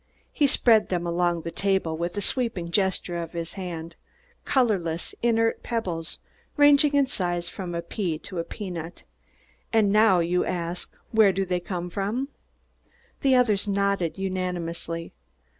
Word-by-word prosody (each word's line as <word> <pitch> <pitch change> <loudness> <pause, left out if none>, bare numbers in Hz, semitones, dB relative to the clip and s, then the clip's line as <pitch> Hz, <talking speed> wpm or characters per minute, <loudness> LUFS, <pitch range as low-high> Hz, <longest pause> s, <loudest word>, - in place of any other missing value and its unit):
He 290 - +3
spread 230 -4 +4
them 175 -2 -1
along 175 0 +1
the 165 - -5
table 190 -5 0
with 170 +4 -3
a - - 0
sweeping 200 -7 -1
gesture 190 -2 0
of 165 0 -7
his 170 0 -4
hand, 170 -3 -6 0.5
colorless, 190 -11 0
inert 225 -1 +2
pebbles, 180 -9 -3 0.4
ranging 290 0 +6
in 280 -1 +5
size 175 -8 -2
from 180 -3 -5
a 170 - -3
pea 170 -2 -2
to 185 +2 -6
a - - 0
peanut. 175 -4 -7 0.7
"And 215 -3 +3
now, 215 -2 +5
you 175 +1 +2
ask, 175 0 -3 0.2
where 220 -3 +6
do 195 +1 -1
they 180 -1 0
come 175 0 -4
from?" 215 +9 -2 0.9
The 270 -1 +4
others 215 -6 +3
nodded 200 -5 0
unanimously. 175 -3 -3
185 Hz, 145 wpm, -26 LUFS, 170-215 Hz, 0.9 s, ranging